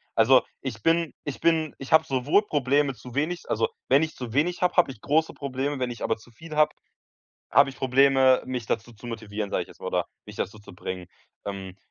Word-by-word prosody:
Also 125 +3 +6 0.2
ich 115 -5 -5
bin 165 -1 +2
ich 145 - -5
bin 160 -2 +2
ich 135 - -9
habe 160 - +6
sowohl 135 +10 +2
Probleme 140 -3 +1
zu 125 0 -12
wenig 165 +5 -2
also, 460 - +2 0.2
wenn 140 - +6
ich 160 - -4
zu 125 -3 -6
wenig 165 +8 +1
habe, 180 0 +1
habe 175 -6 +5
ich 110 - -14
große 160 +2 +1
Probleme, 140 +1 -3
wenn 125 -1 -1
ich 120 - -7
aber 110 - +1
zu 115 +2 -18
viel 155 +5 -10
habe, 155 0 +4 0.8
habe 140 +3 +5
ich 135 - -11
Probleme, 130 0 +4
mich 125 -3 -4
dazu 115 +3 -2
zu 115 +1 -12
motivieren, 110 -3 -4
sag - - +1
ich - - -7
jetzt - - -16
mal - - -5
oder - - 0 0.2
mich - - -10
dazu 105 +3 -4
zu 105 - -14
bringen. 90 0 -6 0.4
Ähm, 95 -2 -6
135 Hz, 220 wpm, -26 LUFS, 115-150 Hz, 0.8 s, Also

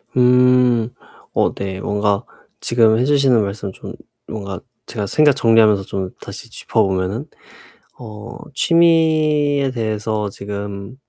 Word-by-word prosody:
음. 125 -2 +4 0.4
어 - - +1
네. 95 -1 -5
뭔가 105 -1 0 0.4
지금 115 -2 +3
해 125 - +1
주시는 135 -6 +3
말씀 100 0 -5
좀 - - -10 0.3
뭔가 100 -4 -6 0.3
제가 105 - -4
생각 150 +8 +4
정리하면서 115 -5 +4
좀 95 -1 -4
다시 - - -9
짚어 - - -1
보면은 95 +6 -2 0.7
어 110 -1 -9 0.2
취미에 155 -3 +2
대해서 110 -2 -2
지금 100 +3 -7
110 Hz, 225 characters per minute, -19 LUFS, 100-130 Hz, 0.7 s, 음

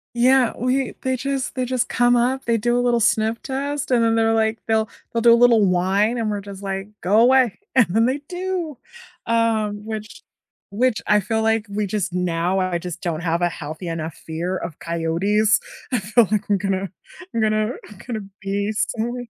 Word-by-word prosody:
Yeah, 250 0 +4
we 255 +2 0
they 260 0 0
just 270 0 -3
they 255 -1 -1
just 250 -1 -1
come 245 0 +3
up, 255 +3 +1
they 230 -1 +2
do 240 +2 +1
a - - +2
little 240 -1 +2
sniff 220 +1 +1
test, 280 +1 -3
and 235 -2 +4
then 225 0 +2
they're 225 0 +3
like 220 0 +1
they'll 220 -1 +1 0.2
they'll 230 - 0
do 235 0 +7
a - - +7
little 235 -3 +5
whine 190 +6 +2
and 220 -2 -1
we're 205 - -3
just 200 0 -10
like, 195 0 -3
"Go 205 +4 +3
away," 250 -2 +4 0.2
and 255 -5 +6
then 225 +5 +3
they 260 +4 0
do, 360 -5 -4 0.5
um, 220 -2 0
which 220 0 -7 0.5
which 240 +2 +1
I 210 - +5
feel 220 +3 -1
like 225 0 +1
we 205 +1 -1
just 195 -2 -2
now 180 +1 0
I 185 -2 0
just 175 -1 -7
don't 165 -2 -2
have 170 0 0
a 175 - +2
healthy 160 +2 -7
enough 165 -1 -4
fear 170 +4 -4
of 155 - -7
coyotes. 180 +6 +1 0.3
I 250 - +1
feel 215 +3 +3
like 210 -1 -1
I'm 200 - +3
gonna 195 -1 -2 0.4
I'm 230 - 0
gonna 215 +1 +1 0.2
I'm 210 - -13
gonna 220 -3 -3 0.2
be 200 +2 -1
sorry 240 +2 -2
220 Hz, 200 wpm, -22 LUFS, 195-240 Hz, 0.5 s, do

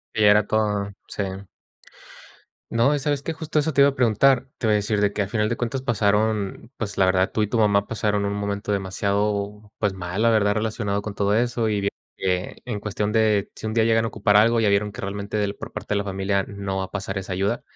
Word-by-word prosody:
Ella 105 -2 +5
era 105 0 +4
todo. 105 -2 0 0.2
Sí. 100 - -3 1.5
No, 120 +6 +3
¿y - - -1
sabes 145 -1 -1
qué? 165 - -3
Justo 155 -1 -2
eso 155 0 0
te 140 - +4
iba 140 - +7
a 140 - -13
preguntar, 125 +2 +3
te - - -4
iba 110 - +3
a - - +4
decir 105 0 0
de 100 -1 +2
que 105 - -1
a 100 - -1
final 105 +1 0
de 115 - 0
cuentas 130 +3 -3
pasaron, 110 0 0
pues, 100 -3 -4
la 95 - +4
verdad, 95 +1 +2
tú 110 - +1
y - - 0
tu 115 +1 -1
mamá 100 -1 +3
pasaron 105 -2 -1
un 100 - -1
momento 100 0 -3
demasiado, 100 +1 -1
pues, 105 -3 0
mal, 95 +3 -3
la 115 - +5
verdad, 105 -2 +3
relacionado 105 -2 -1
con 105 - -5
todo 100 +1 +1
eso. 120 -1 +1
Y 105 -1 0
bi 100 - +1 0.3
e 90 -1 -1
en 115 -5 -3
cuestión 105 0 -2
de 110 -3 +2
si - - -8
un 110 - -3
día 115 -1 +3
llegan 115 0 +3
a - - 0
ocupar 105 -1 +2
algo, 115 +2 +4
ya 105 - +3
vieron 105 +1 +1
que - - -8
realmente 100 +1 -2
por - - -9
parte - - -4
de - - +1
la 100 - -2
familia 95 0 0
no 100 -1 -4
va 95 - -1
a - - -16
pasar 100 -1 -4
esa 95 -1 -4
ayuda. 100 +2 -1
105 Hz, 245 wpm, -23 LUFS, 100-110 Hz, 1.5 s, iba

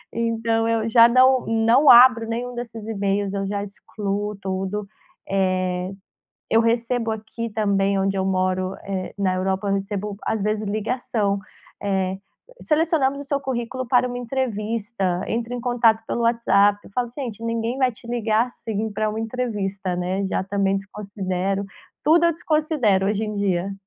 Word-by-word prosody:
então 230 0 0
eu 225 -1 0
já 230 0 +8
não 255 +1 +4
não 230 +6 +4
abro 240 -2 +8
nenhum 240 +2 -4
desses 230 -3 -7
emails, 200 -2 -1
eu 195 0 -2
já 200 0 -2
excluo 205 0 -4
tudo, 195 +1 -3 0.4
eh, 185 -1 0 0.6
eu 225 - +4
recebo 230 0 0
aqui 220 +2 -5
também 200 -2 +1
onde 195 0 0
eu 190 - 0
moro, 185 0 0
eh, 190 -2 -4
na 190 -2 +1
Europa, 190 +2 -1
eu - - +2
recebo 200 +1 -3
às 220 - -1
vezes 215 +1 -1
ligação, 210 -1 -1 0.4
eh, 190 -2 -1 0.4
"Selecionamos 305 -3 +1
o - - -6
seu 280 0 -1
currículo 255 -1 -4
para 250 0 +3
uma 245 0 -5
entrevista, 225 -6 -2
entre 235 +1 -2
em 245 - -5
contato 230 -2 +2
pelo 235 - -2
WhatsApp", 205 -3 +3
eu - - -15
falo; 240 +2 -2
"Gente 230 -6 -5
ninguém 230 +2 -2
vai 260 -2 +2
te 235 +1 -16
ligar 230 -1 +1
assim 220 -3 -4
pra 215 +1 -1
uma 215 - -4
entrevista", 210 -5 -3
né, 185 +2 -1
já 190 - -1
também 195 0 0
desconsidero, 195 -1 -3 0.4
tudo 335 +2 +5
eu 335 - +3
desconsidero 305 - +1
hoje 210 +1 0
em 210 -1 -4
dia. 195 -1 0
215 Hz, 160 wpm, -23 LUFS, 195-235 Hz, 0.6 s, já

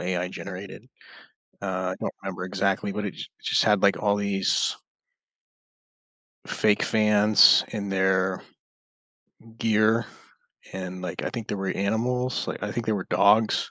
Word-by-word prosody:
AI 90 0 -2
generated, 95 0 -9 0.8
uh, 95 -1 -2
I - - -4
don't - - -4
remember 90 -1 -5
exactly, 100 +1 -1
but 105 +1 -4
it 100 - -3
j - - -8 0.2
just - - +2
had, 105 -3 +3
like, 100 -1 +4
all 100 -1 +1
these 100 -1 0 1.7
fake 105 -1 +1
fans 105 -1 +5
in 100 -2 -5
their 95 -1 +1 1.2
gear, 110 +1 +2 0.7
and, 95 -1 -6
like, 90 - -5
I - - -3
think 115 -3 -6
there 105 - -2
were 95 0 -3
animals, 120 +6 -1
like, - - -5
I 105 - -3
think 120 -1 -3
there 110 - +1
were 95 -3 -4
dogs, 105 +2 +3
100 Hz, 145 wpm, -25 LUFS, 95-110 Hz, 1.7 s, fans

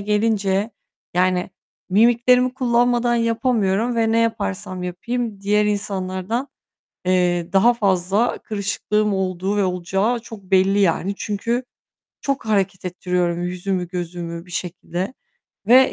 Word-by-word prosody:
gelince, 210 0 +1 0.4
yani, 180 +1 +1 0.4
mimiklerimi 240 +4 +4
kullanmadan 240 -1 +2
yapamıyorum 230 -1 +1
ve 225 -1 +2
ne 230 - +3
yaparsam 185 - -1
yapayım 210 +4 -3
diğer 210 +1 +2
insanlardan, 200 +3 -2 0.6
eee, 180 -1 +1
daha 230 +5 +5
fazla 200 +1 +1
kırışıklığım 210 0 -1
olduğu 190 +1 -1
ve 205 - +3
olacağı 190 +6 0
çok 225 -3 -11
belli 190 +1 +3
yani. 195 +1 +2
Çünkü 230 +4 -2 0.6
çok 275 -4 -2
hareket 195 -3 0
ettiriyorum 180 -1 -1
yüzümü, 180 0 -2
gözümü 175 -1 -5
bir - - -15
şekilde 180 +4 -4 0.5
ve, 260 +3 +6
200 Hz, 115 wpm, -21 LUFS, 185-230 Hz, 0.6 s, ve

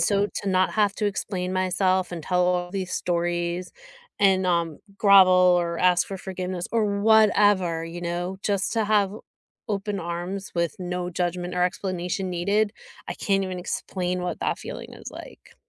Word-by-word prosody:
so 200 +3 +2 0.2
to 200 - -2
not 185 0 +2
have 210 -2 +2
to 210 - 0
explain 185 -2 -3
myself 185 0 +1
and 175 - -5
tell 180 +3 +1
all 180 0 0
these 190 -2 -3
stories 175 0 -1 0.5
and, 190 -2 +4
um, 170 -3 0 0.2
grovel 195 -3 +7
or 180 -2 +3
ask 180 -1 +4
for 195 - -4
forgiveness 185 -1 -4
or 210 -3 +1
whatever, 205 -6 +4
you 170 +1 -7
know, 175 +2 -3
just 200 -1 0
to 225 -2 +1
have 205 -2 +2 0.6
open 200 -1 -2
arms 175 +3 -5
with 170 +4 0
no 180 0 -3
judgment 175 0 -2
or 180 - +1
explanation 185 0 -2
needed, 200 +4 +1 0.4
I - - -3
can't 195 -1 0
even 185 -1 -5
explain 180 0 -3
what 180 - -4
that - - -1
feeling - - -8
is - - -9
like. - - -12
185 Hz, 165 wpm, -25 LUFS, 175-200 Hz, 0.6 s, grovel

